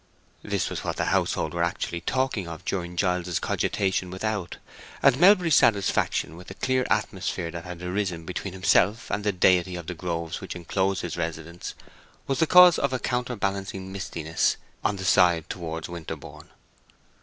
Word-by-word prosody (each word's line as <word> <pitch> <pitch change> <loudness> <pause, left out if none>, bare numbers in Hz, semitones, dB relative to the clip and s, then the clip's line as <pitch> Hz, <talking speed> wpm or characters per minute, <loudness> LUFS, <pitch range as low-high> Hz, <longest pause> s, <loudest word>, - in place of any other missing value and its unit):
This - - -1
was - - -4
what - - -2
the - - 0
household - - 0
were 85 - -1
actually 85 0 -2
talking 130 -3 -1
of 85 +1 -8
during 90 -2 -3
Giles's 90 -1 0
cogitation 95 -2 0
without; 95 -1 -3 0.5
and 140 -1 +5
Melbury's 180 -3 +6
satisfaction 100 -5 +2
with 90 +1 -12
the 95 - -9
clear 130 +2 0
atmosphere 95 -4 -1
that 85 +1 -7
had 90 -1 -8
arisen 90 -2 -2
between 90 +2 -5
himself 95 +3 +2
and 105 - -1
the 105 - +2
deity 90 -1 +3
of 85 -2 -6
the 90 - -4
groves 85 +1 -4
which 95 - -6
enclosed 95 +2 -1
his 85 - -4
residence 85 0 -5 0.5
was 135 - -1
the 160 - +3
cause 180 0 +8
of 140 -1 0
a - - +1
counterbalancing 100 -7 -3
mistiness 80 -4 -1 0.3
on 100 +1 +1
the 95 -1 -6
side 85 -3 +4
towards 80 -2 -5
Winterborne. 85 -2 -8
95 Hz, 165 wpm, -26 LUFS, 85-105 Hz, 0.5 s, cause